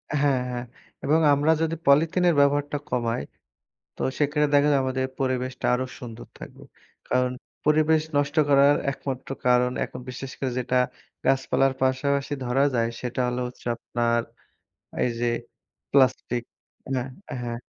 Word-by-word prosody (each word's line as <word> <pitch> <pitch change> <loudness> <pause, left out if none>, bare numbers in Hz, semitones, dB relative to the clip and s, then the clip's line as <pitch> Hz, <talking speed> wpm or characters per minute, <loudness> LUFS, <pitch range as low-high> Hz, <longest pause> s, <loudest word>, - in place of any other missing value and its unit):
হ্যাঁ, 140 -3 +2
হ্যাঁ 120 0 -3 0.4
এবং 150 +3 +3
আমরা 145 +3 +3
যদি 165 0 0
পলিথিনের 165 +5 +4
ব্যবহারটা 145 +1 +2
কমাই 115 - -1 0.7
তো - - -8 0.2
সেখানে 150 0 +2
দেখা 145 +1 +5
যায় 140 - +3
আমাদের 130 0 -1
পরিবেশটা 130 -1 -2
আরো 130 +1 0
সুন্দর 120 -2 -9
থাকবে। - - -11 0.4
কারণ 125 0 +1 0.3
পরিবেশ 155 +1 +4 0.2
নষ্ট 145 0 0
করার 140 +1 +6 0.2
একমাত্র 135 -1 -6 0.2
কারণ 125 0 +4
এখন - - -7
বিশেষ 130 +1 -6
করে 130 -2 -1
যেটা 125 0 0 0.5
গাছপালার 135 0 +2
পাশাপাশি 140 +2 +1
ধরা 130 +3 +2
যায় 115 -1 +2
সেটা 125 0 -4
হল 125 0 -2
হচ্ছে 125 - -13
আপনার 120 0 0 0.8
এই 125 - +2
যে 120 - +1 0.7
প্লাস্টিক 130 -2 +3 0.5
হ্যাঁ, 130 0 -2 0.3
হ্যাঁ, 120 -1 -4
130 Hz, 135 wpm, -25 LUFS, 125-145 Hz, 0.8 s, করার